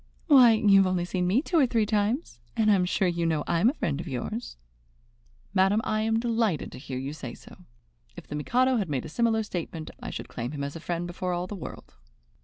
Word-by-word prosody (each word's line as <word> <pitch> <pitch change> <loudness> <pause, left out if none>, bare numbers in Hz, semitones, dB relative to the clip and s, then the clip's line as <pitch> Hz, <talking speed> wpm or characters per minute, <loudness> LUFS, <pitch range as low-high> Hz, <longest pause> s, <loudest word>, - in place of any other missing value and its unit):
"Why, 260 -8 +7
you 210 -3 +5
have 195 - +4
only 180 -1 0
seen 180 0 -1
me 225 +10 +2
two 340 -1 +1
or 270 - +5
three 230 -3 +1
times, 210 - -1 0.2
and 215 -1 +4
I - - +6
am 185 -2 +3
sure 185 +1 +1
you 170 -1 -1
know 160 -3 +1
I'm 170 +7 +3
a 280 - -3
friend 150 - -2
of 175 - -9
yours." 190 - -5 1.0
"Madam, 195 +3 +3
I 215 0 0
am 225 +1 +1
delighted 225 - 0
to - - -9
hear 130 -1 -6
you 135 +3 -4
say 130 -6 -7
so. - - -15 0.6
If - - -10
the - - -8
Mikado 250 - +2
had 200 -7 -1
made 135 -4 -2
a - - -7
similar 225 +4 +1
statement, 170 -5 -5
I - - -6
should - - -6
claim 120 +5 -5
him 140 -1 -4
as 140 +2 -5
a - - -6
friend 170 +1 -3
before 180 +1 -3
all 175 0 -2
the 185 - -7
world." 155 - -10
185 Hz, 235 wpm, -27 LUFS, 160-225 Hz, 1.0 s, Why